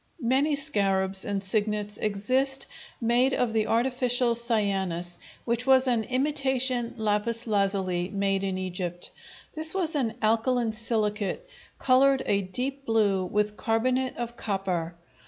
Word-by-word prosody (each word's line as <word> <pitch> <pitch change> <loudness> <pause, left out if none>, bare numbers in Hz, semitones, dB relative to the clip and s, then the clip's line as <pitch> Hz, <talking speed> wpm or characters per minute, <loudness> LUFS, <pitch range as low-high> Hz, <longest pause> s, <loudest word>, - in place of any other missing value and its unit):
Many 270 +4 +1
scarabs 195 -9 +1
and 200 -1 -2
signets 210 +1 0
exist 255 +7 +1 0.3
made 245 +3 +2
of 240 -3 0
the 220 -1 +1
artificial 245 0 +1
cyanus, 195 -7 0 0.3
which 235 +2 -1
was 265 0 +5
an 235 -4 +1
imitation 260 -3 0
lapis 220 +2 +1
lazuli 195 -4 0
made 195 -1 0
in 190 -1 -2
Egypt. 180 -1 -4 0.4
This 315 +2 +3
was 350 -4 0
an 240 -7 -1
alkaline 230 +1 +1
silicate, 215 - -2 0.3
colored 270 +1 +3
a 200 0 +1
deep 255 +9 -3
blue 210 -5 +1
with 210 +3 -1
carbonate 250 +3 0
of 240 0 -5
copper. 185 -6 -3
225 Hz, 125 wpm, -26 LUFS, 200-255 Hz, 0.4 s, was